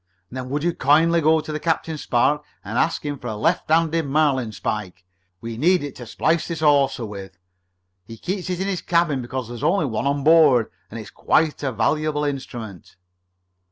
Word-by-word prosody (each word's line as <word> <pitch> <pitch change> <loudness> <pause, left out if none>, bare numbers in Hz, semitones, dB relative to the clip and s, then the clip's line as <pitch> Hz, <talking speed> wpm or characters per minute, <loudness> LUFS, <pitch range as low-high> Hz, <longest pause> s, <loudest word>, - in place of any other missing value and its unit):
"Then 130 0 -6
would 145 +2 -2
you 175 0 +1
kindly 165 +4 +3
go 160 +1 +3
to 155 0 -5
Captain 160 0 -1
Spark 150 +1 +1 0.2
and 115 +5 -2
ask 165 - 0
him 145 -2 -3
for - - -7
a 110 - -3
left 165 +9 0
handed 165 0 +2
marlinspike? 125 - -1 0.4
We 115 -1 -6
need 180 +3 +3
it 145 -2 -6
to 120 - -9
splice 160 +7 0
this 165 -2 -5
hawser 140 -5 +3
with. 100 -2 -9 0.7
He 115 - -10
keeps 185 - -4
it 180 -1 -2
in 190 - -1
his 190 -3 -2
cabin 170 -6 +1
because 125 -1 -5
there's 120 -1 -7
only 185 -2 +2
one 115 0 -2
on 140 0 0
board 150 -7 +5 0.2
and 115 - -7
it's 105 -1 -10
quite 155 -1 +1
a 135 -2 -1
valuable 150 +5 0
instrument." 120 -8 -6
145 Hz, 185 wpm, -22 LUFS, 120-160 Hz, 0.7 s, board